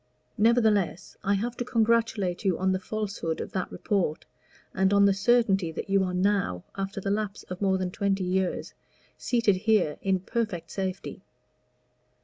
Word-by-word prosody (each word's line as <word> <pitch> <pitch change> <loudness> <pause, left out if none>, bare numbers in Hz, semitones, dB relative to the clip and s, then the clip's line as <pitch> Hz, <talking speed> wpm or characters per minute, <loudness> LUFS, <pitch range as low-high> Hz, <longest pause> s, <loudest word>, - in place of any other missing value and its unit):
Nevertheless 220 -5 +2
I 200 +1 +2
have 235 +5 -2
to - - -1
congratulate 225 -5 +1
you 190 -4 +1
on 190 +1 +1
the 185 - 0
falsehood 200 -5 -3
of - - -5
that 185 - -3
report, 185 -7 -1 0.5
and 190 0 +2
on 200 0 +5
the 200 - +5
certainty 195 -4 +2
that 195 - -5
you 195 -1 +4
are 180 -1 -2
now, 185 - +1
after 195 0 -4
the 195 +1 -2
lapse 210 -1 -2
of 185 - -5
more 190 -1 +2
than 185 -1 -2
twenty 195 0 0
years, 185 0 -1 0.4
seated 230 -6 +1
here 205 -6 +1
in 190 -1 +1
perfect 190 -4 -3
safety." 190 -1 -4
195 Hz, 160 wpm, -27 LUFS, 185-215 Hz, 0.5 s, on